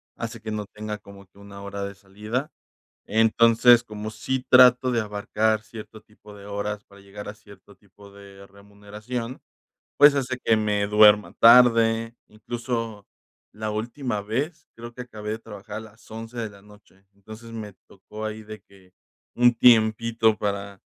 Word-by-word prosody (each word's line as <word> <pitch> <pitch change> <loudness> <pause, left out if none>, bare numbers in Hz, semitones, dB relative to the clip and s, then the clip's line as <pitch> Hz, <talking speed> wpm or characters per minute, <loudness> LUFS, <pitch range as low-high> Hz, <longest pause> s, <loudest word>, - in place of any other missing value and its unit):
hace 115 0 -7
que 110 -1 -6
no 105 -1 -4
tenga 105 0 -7
como 100 -1 -15
que 95 +1 -24
una 100 0 -12
hora 100 0 -6
de 100 0 -8
salida. 105 +9 -5 0.5
Entonces, 115 +2 +4
como 105 -1 -7
sí 130 +3 -3
trato 125 0 +6
de 120 - +1
abarcar 105 +1 -1
cierto 110 0 -11
tipo 105 -1 -17
de 100 0 -13
horas 105 0 -4
para 100 0 -19
llegar 100 +1 -10
a - - -7
cierto 100 -1 -18
tipo 100 0 -19
de 100 0 -14
remuneración, 105 +5 -8 0.6
pues, 145 0 +7
hace 130 -2 -2
que 110 - +3
me 105 -1 0
duerma 105 0 +5
tarde, 115 -1 +5
incluso, 115 -1 -5 0.5
la 110 0 -4
última 115 0 -4
vez. 135 - -4
Creo 120 +1 -10
que 125 - -7
acabé 105 -3 -9
de 110 - -4
trabajar 105 -1 -9
a - - -4
las 110 0 -16
11 115 +2 -9
de 110 -2 -3
la 100 -1 -17
noche. 100 -1 -21
Entonces, 110 +3 -13
me 105 -3 -7
tocó 105 +3 -10
ahí 110 0 -6
de 110 0 -10
que 95 -2 -22 0.4
un 120 0 +4
tiempito 115 -1 +3
para, 100 -1 -4
110 Hz, 165 wpm, -24 LUFS, 100-115 Hz, 0.6 s, pues